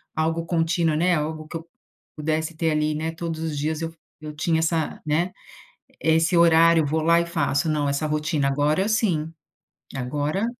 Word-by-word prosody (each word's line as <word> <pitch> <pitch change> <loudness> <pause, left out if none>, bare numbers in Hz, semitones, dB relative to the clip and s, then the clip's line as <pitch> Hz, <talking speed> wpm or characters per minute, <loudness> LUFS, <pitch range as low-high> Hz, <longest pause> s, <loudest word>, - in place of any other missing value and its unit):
algo 165 +1 0
contínuo, 165 -1 +1
né, 175 +2 +2
algo 155 0 -3
que 165 - -5
eu 165 +1 -12 0.5
pudesse 155 +1 -2
ter 160 0 0
ali, 150 0 0
né, 160 +1 -2
todos 165 -1 -5
os 155 -3 -3
dias 155 +2 -2
eu 165 0 -4 0.3
eu 155 0 -8
tinha 160 +1 +1
essa, 160 -1 -1
né, 165 +5 0 0.7
esse 160 +2 +2
horário: 165 -1 +5
"Vou 155 +2 0
lá 170 +1 +4
e 170 - -1
faço." 160 -2 0
Não, 150 -2 0
essa 140 +2 -1
rotina 150 -1 0
agora, 150 +7 +1
sim. 175 -8 0 0.6
Agora 145 - -1
160 Hz, 170 wpm, -24 LUFS, 150-165 Hz, 0.7 s, horário